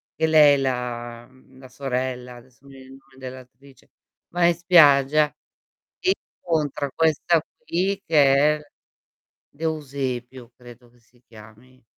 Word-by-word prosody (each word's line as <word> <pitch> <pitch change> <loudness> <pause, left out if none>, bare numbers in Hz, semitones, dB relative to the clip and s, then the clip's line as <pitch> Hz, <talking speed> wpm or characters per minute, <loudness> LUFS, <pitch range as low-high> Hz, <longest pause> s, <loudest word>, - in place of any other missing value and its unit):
che 160 - 0
lei, 150 -3 +5
la, 120 -2 -4
m 130 - -25
mhmm, 130 0 -22
la 130 - -13
sorella- 125 -2 -4
adesso 120 0 -20
non 140 0 -17
mi 135 - -14
viene 130 0 -14
il 135 - -15
nome 135 0 -25
dell'attrice, 130 +1 -13 0.4
va 175 0 +1
in 170 - +4
spiaggia 150 -4 +4 0.6
e 370 +1 +2 0.3
incontra 150 -4 -2
questa 160 0 +1 0.2
qui 195 +3 -1
che 145 -4 +4 0.2
è - - -7
l 150 - -17 0.8
D'Eusepio, 135 -5 -5
credo 120 0 -16
che 120 +1 -28
si 120 +1 -30
chiami. 110 +4 -18
135 Hz, 145 wpm, -23 LUFS, 125-150 Hz, 0.8 s, lei